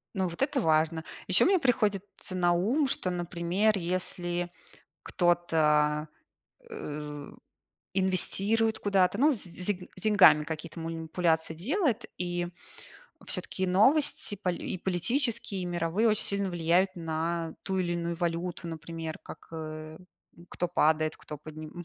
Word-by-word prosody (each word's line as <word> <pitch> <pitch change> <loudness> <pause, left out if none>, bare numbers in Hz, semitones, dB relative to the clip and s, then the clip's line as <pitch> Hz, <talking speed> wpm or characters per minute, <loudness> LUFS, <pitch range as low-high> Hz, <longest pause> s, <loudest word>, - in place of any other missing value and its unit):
Ну, 190 -1 +1
вот 170 -1 -7
это 270 0 +2
важно. 160 -1 +2 0.2
Ещё 185 - +4
мне 375 +1 +4
приходит 210 - +2
ц 185 - -6
на 175 -1 +3
ум, 240 - +2
что, 185 - -1
например, 180 +4 0
если 175 -1 -2 0.5
кто-то, 155 -3 +2 0.6
э, 150 -1 -6
у, - - -15 0.6
инвестирует 200 +4 +1
куда-то, 195 -1 +2
ну, 300 +3 +5
с 230 - -5
с 180 0 -8
д 190 -3 -2
с 185 - -12
деньгами 200 -8 +6
какие-то 160 +2 -6
манипуляции 165 0 -1
делает, 245 - 0
и 175 -1 -2 0.8
всё-таки 190 - -2
новости 265 +6 +3
поли 180 -2 -2
и - - -4
политические, 215 - -1
и - - -3
мировые 175 +5 +1
очень 215 -1 +2
сильно 200 -1 0
влияют 175 +2 +2
на 165 0 -2
ту 190 -1 -1
или 175 -2 0
иную 170 0 -2
валюту, 170 +1 -2
например, 165 0 -6
как, - - -11
э, 155 0 -7 0.4
м, 170 - -15
кто 175 - -2
падает, 155 -2 +2
кто 150 - -8
подним 155 +3 -9
175 Hz, 140 wpm, -29 LUFS, 165-195 Hz, 0.8 s, деньгами